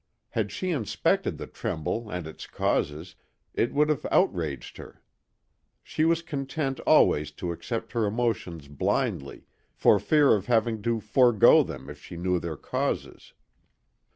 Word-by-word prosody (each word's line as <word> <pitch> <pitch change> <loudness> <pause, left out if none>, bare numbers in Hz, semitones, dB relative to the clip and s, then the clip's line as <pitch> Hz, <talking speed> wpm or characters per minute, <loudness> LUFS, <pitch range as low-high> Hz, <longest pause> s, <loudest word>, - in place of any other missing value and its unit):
Had - - -2
she 185 -1 -3
inspected 130 -11 0
the - - -6
tremble 105 +8 -4
and 90 -4 -4
its 80 - -9
causes, 80 +5 -1 0.4
it 120 - 0
would 150 +1 +3
have 150 - 0
outraged 75 -8 0
her. - - -12 0.8
She 155 - -1
was 165 0 +2
content 140 -2 -3
always 75 0 +4
to 85 +3 -4
accept 115 +6 -5
her 115 -4 0
emotions 100 -9 -2
blindly 70 -1 -2 0.3
for - - +4
fear 150 -3 +4
of 100 -2 -1
having 115 -2 +1
to 115 +1 -1
forego 120 -1 +5
them 65 - -6
if 75 0 -11
she 85 - -9
knew 90 +1 0
their 80 -2 -5
causes. - - -4
110 Hz, 145 wpm, -27 LUFS, 80-130 Hz, 0.8 s, forego